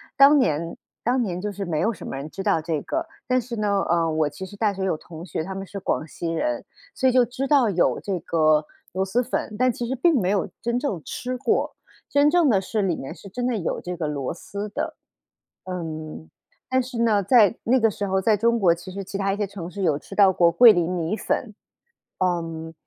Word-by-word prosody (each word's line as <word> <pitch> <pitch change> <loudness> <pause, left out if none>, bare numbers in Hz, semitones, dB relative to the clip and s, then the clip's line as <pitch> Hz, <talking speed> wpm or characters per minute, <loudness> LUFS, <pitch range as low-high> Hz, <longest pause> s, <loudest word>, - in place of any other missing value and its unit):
当 280 +2 +7
年 165 - 0 0.3
当 245 +2 +2
年 180 -5 -2
就 210 +1 -3
是 200 0 -5
没 160 -3 -1
有 225 - +2
什 220 - -9
么 - - -5
人 140 +3 -6
知 195 - -6
道 200 -6 +2
这 160 -1 -2
个， 330 +1 -2 0.2
但 255 0 +2
是 235 0 -6
呢， 205 -2 +1
呃， 165 -1 +2
我 155 -1 +1
其 150 +6 -8
实 205 - -11
大 210 0 +1
学 190 0 -3
有 185 - +1
同 165 +1 -10
学， 160 -2 -3
他 190 - -5
们 195 0 -5
是 200 - -6
广 160 -4 -1
西 170 +2 -6
人， 300 - -1 0.3
所 260 -1 +2
以 - - +3
就 250 -1 +5
知 250 +3 -4
道 270 -5 +4
有 175 - +2
这 195 -3 -3
个 155 -2 +3 0.3
螺 190 +1 0
蛳 225 +6 +1
粉， 230 -3 -3
但 255 - +4
其 240 - -4
实 250 - -2
并 330 +4 +3
没 180 - 0
有 195 -2 +1
真 235 +1 0
正 215 - -2
吃 255 +1 -4
过， 250 -2 0 0.3
真 285 +1 +4
正 340 0 +4
的 195 -4 +3
是 210 +2 -2
里 180 -4 +1
面 135 - -7
是 200 - -13
真 245 +6 -4
的 245 -3 0
有 175 - -2
这 180 0 -5
个 160 -3 -2
螺 140 -2 -3
蛳 200 +4 -6
的。 - - -3 0.7
嗯， 155 - -6 0.4
但 260 0 +3
是 245 -2 -6
呢， 215 -3 +3
在 220 0 +5
那 255 +3 +3
个 225 -2 +3
时 200 0 -3
候 190 0 +1
在 215 +1 +3
中 235 +2 +2
国， 175 -4 +5
其 175 +2 -10
实 195 - -5
其 195 +1 -5
它 195 0 0
一 - - -4
些 205 - 0
城 185 -3 -7
市 200 +2 -7
有 150 -4 +2
吃 195 - -11
到 195 -2 +6
过 170 -2 +4
桂 230 +6 +8
林 175 -3 +1
米 180 +4 -1
粉。 220 -4 -2 0.7
嗯， 165 -2 -2
195 Hz, 255 characters per minute, -24 LUFS, 170-235 Hz, 0.7 s, 桂